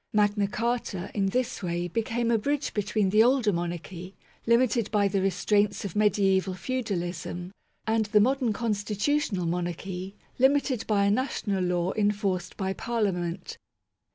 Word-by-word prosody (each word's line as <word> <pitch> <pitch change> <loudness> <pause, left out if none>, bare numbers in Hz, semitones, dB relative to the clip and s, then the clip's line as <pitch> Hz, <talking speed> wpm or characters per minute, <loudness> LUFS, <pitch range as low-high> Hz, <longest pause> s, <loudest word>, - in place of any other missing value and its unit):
Magna 205 -1 +2
Carta, 225 -4 -2
in 195 -2 +1
this 250 +5 -1
way, 175 -1 -2
became 230 +5 -1
a 230 - +4
bridge 285 +5 -1
between 205 -1 0
the 215 +2 +6
older 240 -3 +3
monarchy, 175 +2 -5 0.3
limited 235 -2 +3
by 205 -2 +2
the 195 0 0
restraints 205 +2 +1
of 190 - -5
mediaeval 195 -2 +2
feudalism, 180 -6 -3 0.3
and 220 -1 +1
the 210 0 +4
modern 255 +1 +2
constitutional 210 0 -1
monarchy, 180 +3 -4 0.2
limited 265 -2 +2
by 200 -2 +2
a 200 - +3
national 205 -5 -1
law 180 0 0
enforced 205 -4 -1
by 190 -1 -1
Parliament. 195 -7 -2
205 Hz, 135 wpm, -27 LUFS, 185-230 Hz, 0.3 s, the